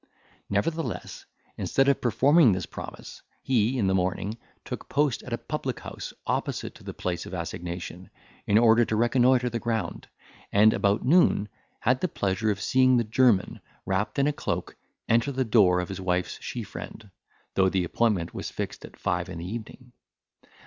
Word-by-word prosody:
Nevertheless, 160 +11 -2 0.3
instead 135 - +1
of 140 - +3
performing 130 - +5
this 90 -2 -2
promise, - - -9 0.2
he, 125 0 +2
in 110 - +1
the 95 - +2
morning, 95 +4 -1 0.3
took - - -7
post 145 -3 +1
in - - -10
a - - 0
public - - -4
house - - -7
opposite - - -2
to - - -16
the - - -6
place 90 -2 -3
of - - -6
assignation, 90 +1 -6 0.4
in 105 - +4
order 115 0 +6
to 110 -1 -1
reconnoitre 125 +2 +3
the 115 - -2
ground, 115 -1 -3 0.4
and 105 +2 +6
about 100 +3 +1
noon 135 - +4 0.3
had 125 +2 +2
the 185 - +2
pleasure 100 - -1
of 100 -2 0
seeing 130 +4 +4
the 120 - +2
German, 110 -3 +2 0.2
wrapped 100 +3 -1
in 140 - +3
a 150 - +1
cloak, - - -3 0.3
enter 115 +4 +2
the 130 -1 -1
door 100 -6 +4
of 90 - -3
his 95 0 -5
wife's 90 -1 -1
she - - -5
friend, 105 -3 -9 0.4
though 95 -1 +3
the 95 -1 0
appointment 95 -1 0
was - - -5
fixed - - -5
at - - -12
five 90 0 -1
in 90 - -6
the 85 - -6
evening. 120 +5 -8
110 Hz, 175 wpm, -26 LUFS, 95-125 Hz, 0.4 s, order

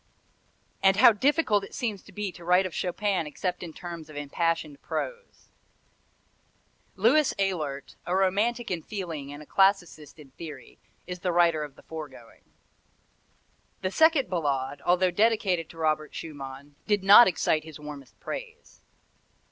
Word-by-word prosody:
And 195 0 +5
how 235 +2 +8
difficult 230 -3 +2
it - - -9
seems 220 -7 -3
to - - -17
be 210 -2 -4
to 175 - -13
write 180 +2 +4
of 185 - -5
Chopin 185 -2 -1
except 180 +4 -3
in 170 - -6
terms 170 -2 -8
of 155 - -12
impassioned 150 0 -2
prose! 485 -1 -6 1.4
Louis 255 +9 +3
Ehlert, 155 -8 -3
a 180 - 0
romantic 210 +5 +1
in 175 -2 -2
feeling 165 -8 -6
and 145 +1 -9
a - - -16
classicist 180 -7 +1
in 145 -4 -15
theory, 145 -2 -10 0.3
is 180 0 -6
the 180 0 -1
writer 170 -2 +3
of 145 -2 -9
the - - -18
foregoing. 145 -7 -10 1.4
The 185 - 0
second 315 0 +4
Ballade, 145 -6 -2
although 180 +1 +3
dedicated 195 -4 +1
to 165 - -14
Robert 155 -1 -1
Schumann, 140 -2 -8
did 205 -2 +1
not 205 +5 +9
excite 160 -3 +1
his 155 -1 -11
warmest 150 -3 -10
praise. 470 -2 -8
175 Hz, 150 wpm, -27 LUFS, 150-200 Hz, 1.4 s, not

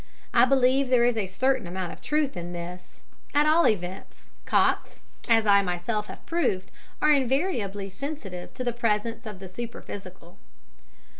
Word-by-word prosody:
I - - +7
believe 265 0 +3
there 245 -2 +5
is 245 -1 +2
a 210 -4 -1
certain 255 +2 0
amount 180 0 -4
of - - -14
truth 300 -4 0
in 175 0 -5
this 175 +1 -8 0.3
at 295 +1 +5
all 315 +2 +5
events 190 -2 -3
cocks, - - +1 0.3
as 225 -1 +5
I 200 -1 +6
myself 195 +4 -2
have - - -10
proved, 265 - -1 0.3
are 300 - +6
invariably 260 - +1
sensitive 195 -5 -6
to 255 - -4
the 240 -1 -1
presence 230 0 -1
of 210 -3 -7
the 190 0 -9
superphysical. 185 -4 -9
220 Hz, 155 wpm, -26 LUFS, 185-260 Hz, 0.3 s, I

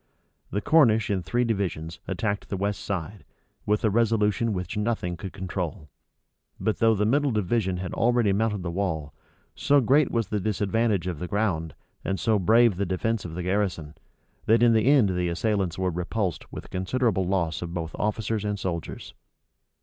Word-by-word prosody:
The 105 - -2
Cornish 110 -10 +4
in 95 -2 0
three 120 +9 0
divisions 90 -8 -2
attacked 100 -2 -2
the 100 - -2
west 100 +1 -2
side, 95 0 -4 0.4
with 105 0 +1
a 110 - +3
resolution 115 0 +2
which 90 -1 -4
nothing 105 -5 -1
could 95 +2 -7
control; 90 -4 -5 0.7
but 110 - -1
though 115 -1 +4
the 105 +1 +1
middle 140 +6 +2
division 105 -3 0
had 90 -1 -5
already 120 -3 +2
mounted 105 -2 0
the 85 - -3
wall, 80 -6 -2 0.4
so 145 0 +3
great 135 +3 +3
was 115 -4 -1
the 105 - -1
disadvantage 105 -1 0
of 90 -5 -3
the 90 - -4
ground, 90 -6 -1 0.3
and 95 - -2
so 110 -2 +2
brave 110 +2 +4
the 100 - 0
defence 105 +4 -1
of 80 -2 -6
the 90 - -4
garrison, 90 -5 -1 0.5
that 115 +2 +5
in 120 -1 +6
the 110 +2 +2
end 135 -8 +5
the 90 -1 0
assailants 95 -1 -1
were 95 -1 0
repulsed 90 +2 -3
with - - -7
a - - -15
considerable 95 0 0
loss 85 -4 0
both 85 -2 -4
of - - -5
officers 105 0 -1
and 105 0 -2
soldiers. 85 -5 -5
100 Hz, 180 wpm, -26 LUFS, 90-110 Hz, 0.7 s, in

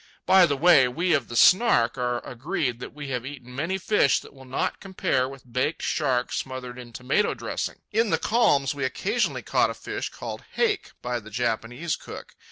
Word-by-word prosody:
By 185 -1 +6
the 145 -3 -1
way, 150 -4 +6
we 165 +8 0
of 140 -5 +1
the 120 - -7
Snark 150 - +5
are 125 -1 -2
agreed 125 -1 -3
that - - -7
we 145 -1 -8
have 125 -2 -2
eaten 125 -2 -9
many 165 +8 -1
fish 190 -6 +3
that - - -14
will 135 -1 -14
not 130 - -2
compare 185 -9 -1
with 130 -3 -13
baked 130 +6 -1
shark 130 -6 0
smothered 125 -1 -5
in 120 -1 -10
tomato 135 - 0
dressing. - - -4
In 225 +1 +2
the - - +2
calms 145 - +2
we 140 -1 -4
occasionally 130 - -1
caught - - +2
a - - -5
fish - - -5
called - - -7
"haké" 435 -3 0
by 125 0 -2
the 110 -1 -12
Japanese 120 +7 -2
cook. - - -10
135 Hz, 190 wpm, -25 LUFS, 125-170 Hz, -, By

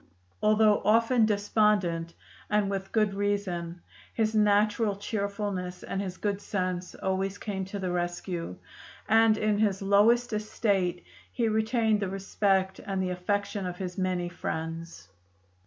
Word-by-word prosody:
Although 215 0 +4
often 225 +2 +4
despondent, 205 -5 +1 0.3
and 210 -1 +1
with 195 -1 -4
good 215 -3 +2
reason, 190 -4 -2 0.3
his 220 -1 +1
natural 210 0 +3
cheerfulness 200 -3 -3
and 195 - -3
his 185 -2 -5
good 205 -1 -2
sense 185 -3 -3
always 190 +1 -2
came 195 -3 -4
to 195 +2 -6
the 185 -2 -2
rescue, 175 - -3 0.5
and 225 0 +5
in 210 -1 +1
his 205 -3 +2
lowest 220 +5 +3
estate 200 -4 0 0.3
he 235 -2 0
retained 220 0 +2
the 200 -2 -2
respect 195 0 0
and 195 -2 -3
the 185 -1 -1
affection 200 +2 -2
of 180 0 -5
his 180 0 -5
many 185 -1 0
friends. 165 - -5
200 Hz, 135 wpm, -28 LUFS, 185-215 Hz, 0.5 s, and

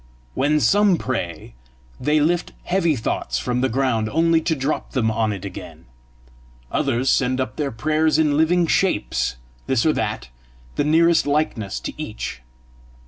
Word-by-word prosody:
When 145 +3 +2
some 200 +2 +4
pray, 90 - -4 0.5
they 150 +1 +2
lift 170 +4 0
heavy 175 -4 +1
thoughts 65 - -2
from 125 - -1
the 130 - +1
ground, 115 -3 0
only 165 +3 +3
to 160 0 0
drop 140 +2 -3
them 115 -5 +1
on 110 -1 0
it 100 -2 -6
again; 95 - -9 0.9
others 130 -3 0
send 130 0 +2
up 130 -4 -2
their 145 -2 -1
prayers 155 +6 +1
in 150 -2 +2
living 170 +3 +3
shapes, 165 - 0 0.3
this 130 -3 +1
or 155 - +4
that, 105 - -3 0.5
the - - +1
nearest 165 +2 +3
likeness 140 -9 -1
to - - -5
each. 105 - -6
135 Hz, 150 wpm, -22 LUFS, 115-160 Hz, 0.9 s, some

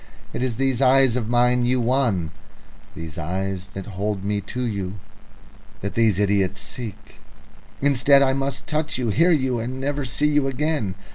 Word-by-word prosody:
It 120 - -3
is 125 -3 -1
these 135 0 0
eyes 135 -2 +5
of 115 -3 -2
mine 125 0 +3
you 125 +1 +2
won, 115 - +1 0.6
these 80 +1 -7
eyes 95 +3 -3
that 95 -1 -5
hold 100 -1 -3
me 100 0 -1
to 125 +5 -5
you, 100 -4 -3 0.9
that 100 - -4
these 110 -5 +3
idiots 100 -2 +1
seek. 110 -4 -8 0.6
Instead, 140 0 +5
I 135 -1 +2
must 135 0 -2
touch 155 0 -1
you, 125 -3 -1
hear 165 - +3
you, 130 -7 +2
and 125 +3 -4
never 145 +1 -1
see 130 +4 -1
you 145 -2 +2
again. 135 -7 -1
120 Hz, 165 wpm, -23 LUFS, 100-135 Hz, 0.9 s, eyes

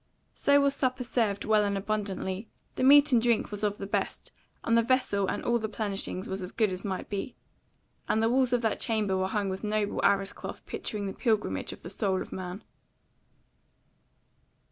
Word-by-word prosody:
So 285 0 +4
was 280 -1 +3
supper 255 -2 -1
served 225 -5 0
well 215 -1 +4
and 200 -1 0
abundantly: 200 0 -3 0.3
the - - -4
meat 285 +2 +7
and 240 -3 +5
drink 235 -2 +1
was 205 0 -4
of 205 -1 0
the 195 - -5
best, 200 - -3 0.3
and 230 - +2
the 230 - +6
vessel 230 -5 +1
and - - -2
all 240 0 +2
the 220 -1 -3
plenishing 200 -3 -3
was 190 +1 -4
as 180 +1 -5
good 215 -4 +1
as 185 - -6
might 190 -2 -3
be; 205 +5 -4 0.7
and 220 - +2
the - - +4
walls 255 +1 +2
of 245 -1 +1
that 220 - 0
chamber 215 -4 0
were 190 0 0
hung 205 0 -1
with 190 +1 -4
noble 210 -1 -1
arras 195 -1 +2
cloth - - -8
picturing 210 -2 -4
the 195 - -3
Pilgrimage 215 - 0
of - - -11
the 175 - -7
Soul 190 -2 0
of - - -7
Man. 185 +2 -6
210 Hz, 195 wpm, -29 LUFS, 195-235 Hz, 0.7 s, meat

